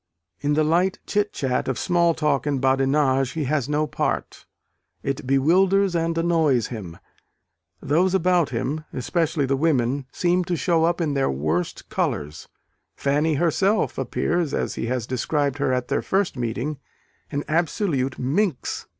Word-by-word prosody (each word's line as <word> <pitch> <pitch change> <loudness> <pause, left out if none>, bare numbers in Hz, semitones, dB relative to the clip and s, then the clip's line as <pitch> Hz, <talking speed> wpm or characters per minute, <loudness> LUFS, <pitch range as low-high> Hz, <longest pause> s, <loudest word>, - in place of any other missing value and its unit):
In 145 0 0
the 155 - +3
light 175 +5 +2
chit 210 0 0
chat 130 -2 -1
of 130 -3 -1
small 170 -2 +2
talk 150 -3 0
and 140 -2 0
badinage 135 0 +2
he 160 - -2
has 145 -1 -1
no 150 +1 +1
part: 150 - -3 0.6
it 135 -1 -3
bewilders 180 +8 +3
and 165 0 0
annoys 160 -8 +2
him. 95 -9 -7 0.9
Those 180 +6 +2
about 180 -3 +2
him 135 +5 -2
especially 155 +3 0
the 135 +1 +1
women 135 -3 +1
seem 180 +1 +1
to 175 - -1
show 165 0 +2
up 170 +1 0
in 155 -3 0
their 135 -1 +1
worst 75 +6 -2
colours. 75 +2 -2 0.5
Fanny 150 +3 +1
herself 190 +7 +1
appears, 170 -4 -1
as - - -2
he - - -3
has 125 -2 -1
described 140 +3 -1
her 135 - +1
at 125 -1 -1
their - - 0
first 195 -4 0
meeting, 125 +4 -3 0.5
an 145 0 -2
absolute 155 -4 0
minx. 150 +4 -1
150 Hz, 150 wpm, -23 LUFS, 130-170 Hz, 0.9 s, the